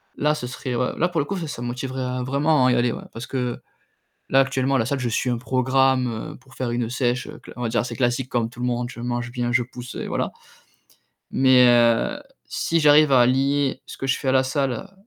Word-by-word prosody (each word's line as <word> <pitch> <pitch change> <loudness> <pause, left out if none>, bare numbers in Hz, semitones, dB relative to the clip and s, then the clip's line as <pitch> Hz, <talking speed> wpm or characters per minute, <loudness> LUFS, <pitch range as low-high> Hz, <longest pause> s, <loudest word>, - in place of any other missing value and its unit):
là, 150 +1 +1
ce 125 - -5
serait, 125 +1 -5
heu, 125 +1 0
là, 175 - +2
pour 175 -3 -2
le - - -3
coup, 195 - -3
ça 150 -8 -5
me - - -3
motiverait 125 0 -3
vraiment 140 +1 +2
à - - +4
y - - +3
aller, 120 -1 +2
ouais, - - -6
parce 115 +1 -6
que, 125 -2 -3 0.7
là, 135 - +5
actuellement, 135 0 +1
à - - +2
la 110 - -1
salle, 140 +1 -1
je 125 -2 -2
suis 125 +2 0
un 120 - -1
programme, 130 0 +2 0.2
heu, - - -11
pour 130 +1 -20
faire 125 -2 -2
une 120 -1 -2
sèche 125 -1 -1
cla - - -12
on 125 - -6
va 115 - 0
dire - - +1
assez 120 - -4
classique, 125 0 0
comme 115 -2 -1
tout 125 - -17
le 125 - -1
monde, 120 0 -2
je - - -12
mange 120 0 -3
bien, 120 -1 -2
je 125 0 +3
pousse 125 0 -9
et - - -5
voilà, - - -2 1.0
mais 130 -1 +5
heu, 120 - +3 0.3
si 165 0 -1
j'arrive 150 -1 +6
à 125 -2 +6
lier 135 +1 +1
ce - - -9
que 135 - -4
je 135 - +1
fais 135 - -5
à - - +3
la 130 0 +4
salle 140 +7 -2
130 Hz, 245 wpm, -23 LUFS, 120-135 Hz, 1.0 s, j'arrive